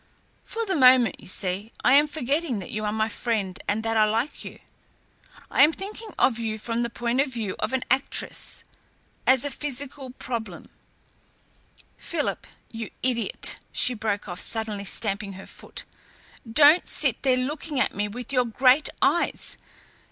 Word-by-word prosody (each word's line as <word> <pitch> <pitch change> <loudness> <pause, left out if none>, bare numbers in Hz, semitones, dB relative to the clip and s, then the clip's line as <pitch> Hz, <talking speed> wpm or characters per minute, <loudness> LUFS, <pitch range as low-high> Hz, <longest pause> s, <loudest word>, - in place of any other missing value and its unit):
For 460 0 -3
the 390 - 0
moment, 255 - +6
you - - -12
see, 190 +3 -2
I 250 - +5
am 295 +2 +6
forgetting 290 -2 -1
that 190 - -7
you 215 0 -3
are 210 - 0
my 220 0 +1
friend 210 -4 -2
and 215 +2 0
that 225 0 0
I 215 - +6
like 225 +7 -1
you. - - -9 0.9
I - - +3
am 295 +3 +8
thinking 420 +5 -7
of 235 -3 +3
you 220 -1 -2
from 230 +2 -2
the 235 - 0
point 240 +2 0
of 275 -1 -1
view 220 -6 -3
of 215 - -1
an 260 -1 0
actress 265 +1 0 0.6
as 260 +1 +5
a 285 - -1
psychical 280 -1 -3
problem. 245 -3 -6 1.3
Philip, - - -3 0.2
you 225 -1 -6
idiot!" 245 -3 0
she 250 - +1
broke 210 -3 -2
off, 175 0 -5
suddenly 215 -3 -2
stamping 200 0 -1
her 190 0 -10
foot, - - -9 0.7
"don't 300 +7 +6
sit - - +1
there 260 -2 +3
looking 285 +2 -3
at - - +1
me 205 +1 -1
with 245 +6 -6
your 250 -1 +3
great 255 +5 +4
eyes. - - +1
240 Hz, 165 wpm, -25 LUFS, 215-270 Hz, 1.3 s, am